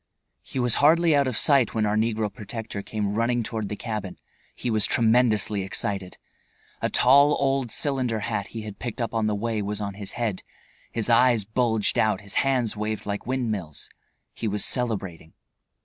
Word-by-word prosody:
He -, -, -8 dB
was 125 Hz, -2 st, +1 dB
hardly 160 Hz, +2 st, +5 dB
out 140 Hz, -1 st, +3 dB
of 125 Hz, -4 st, -1 dB
sight 135 Hz, -7 st, +3 dB
when 110 Hz, -1 st, +1 dB
our 105 Hz, 0 st, +1 dB
negro 110 Hz, -1 st, 0 dB
protector 110 Hz, -2 st, -6 dB
came 105 Hz, 0 st, -3 dB
running 120 Hz, +2 st, +1 dB
toward 110 Hz, -2 st, -4 dB
the 105 Hz, -, -3 dB
cabin. 105 Hz, -4 st, -5 dB, 0.4 s
He 120 Hz, -, -3 dB
was 110 Hz, -2 st, +3 dB
tremendously 110 Hz, -3 st, +2 dB
excited. 95 Hz, -1 st, -3 dB, 0.6 s
A -, -, 0 dB
tall, 140 Hz, +4 st, +5 dB
old 135 Hz, -2 st, +1 dB
cylinder 125 Hz, -4 st, -1 dB
hat 100 Hz, -1 st, -2 dB
he 110 Hz, -1 st, -7 dB
had 105 Hz, -2 st, -8 dB
picked 120 Hz, 0 st, -5 dB
up 115 Hz, -2 st, -2 dB
on 110 Hz, -1 st, +1 dB
the 105 Hz, -, 0 dB
way 110 Hz, +1 st, -2 dB
was 105 Hz, 0 st, -3 dB
on 100 Hz, -1 st, -3 dB
his 100 Hz, 0 st, -7 dB
head, 110 Hz, -6 st, -2 dB, 0.5 s
his 115 Hz, -2 st, 0 dB
eyes 120 Hz, -2 st, +4 dB
bulged 110 Hz, -1 st, +1 dB
out, 110 Hz, +1 st, +2 dB
his 100 Hz, -1 st, -6 dB
hands 130 Hz, -5 st, 0 dB
waved 105 Hz, 0 st, -3 dB
like 100 Hz, +1 st, -4 dB
windmills; 110 Hz, -, -3 dB, 0.4 s
he 115 Hz, -, -4 dB
was 105 Hz, 0 st, +1 dB
celebrating. 95 Hz, -10 st, -1 dB
110 Hz, 180 wpm, -25 LUFS, 105-125 Hz, 0.6 s, hardly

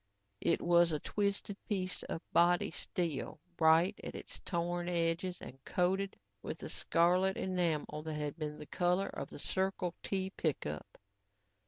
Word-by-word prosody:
It -, -, +2 dB
was 170 Hz, 0 st, +5 dB
a 155 Hz, -, +1 dB
twisted 200 Hz, +1 st, -1 dB
piece 185 Hz, -3 st, 0 dB
of 165 Hz, -, -5 dB
body 175 Hz, 0 st, +4 dB
steel, 165 Hz, -3 st, -2 dB, 0.2 s
bright 165 Hz, +5 st, +5 dB
at -, -, -6 dB
its -, -, -6 dB
torn 175 Hz, 0 st, -1 dB
edges 170 Hz, +1 st, 0 dB
and 135 Hz, +1 st, -10 dB
coated 190 Hz, +2 st, 0 dB, 0.2 s
with -, -, -5 dB
the -, -, -7 dB
scarlet 180 Hz, +3 st, +3 dB
enamel 165 Hz, -5 st, 0 dB
that 155 Hz, -1 st, -3 dB
had 150 Hz, -1 st, -2 dB
been 150 Hz, -2 st, -4 dB
the 150 Hz, -, -8 dB
color 180 Hz, +4 st, +1 dB
of 140 Hz, -, -5 dB
the -, -, -9 dB
Circle 190 Hz, +2 st, 0 dB
T 190 Hz, -1 st, -1 dB
pickup. 105 Hz, -, -3 dB
175 Hz, 150 wpm, -34 LUFS, 160-185 Hz, 0.2 s, was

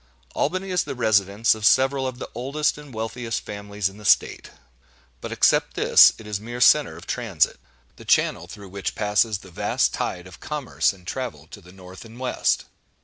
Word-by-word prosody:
Albany 185 Hz, +5 st, -2 dB
is 180 Hz, -2 st, +1 dB
the -, -, -6 dB
residence 105 Hz, -2 st, +2 dB
of 110 Hz, -1 st, -9 dB
several 130 Hz, +4 st, +3 dB
of 130 Hz, -1 st, -6 dB
the -, -, -7 dB
oldest 140 Hz, +6 st, -1 dB
and 150 Hz, -2 st, -12 dB
wealthiest 115 Hz, 0 st, -4 dB
families 100 Hz, -1 st, -4 dB
in 95 Hz, +2 st, -10 dB
the -, -, -13 dB
State; -, -, +2 dB, 0.7 s
but -, -, -6 dB
except -, -, +2 dB
this, -, -, +7 dB
it 110 Hz, -, -13 dB
is 105 Hz, -2 st, -4 dB
a -, -, -17 dB
mere 120 Hz, +2 st, -7 dB
centre 130 Hz, -, +4 dB
of 85 Hz, -, -12 dB
transit—the 110 Hz, -, -3 dB
channel -, -, +1 dB
through 100 Hz, -2 st, -11 dB
which 100 Hz, +1 st, -4 dB
passes 105 Hz, +1 st, +1 dB
the 95 Hz, -1 st, -15 dB
vast -, -, 0 dB
tide 90 Hz, 0 st, -4 dB
of 95 Hz, -1 st, -13 dB
commerce 150 Hz, -3 st, -1 dB
and 95 Hz, -3 st, -17 dB
travel 125 Hz, +5 st, -5 dB
to 105 Hz, -, -11 dB
the 90 Hz, 0 st, -16 dB
north 95 Hz, 0 st, -13 dB
and 115 Hz, +1 st, -13 dB
west. 130 Hz, -1 st, 0 dB
110 Hz, 190 wpm, -23 LUFS, 100-130 Hz, 0.7 s, this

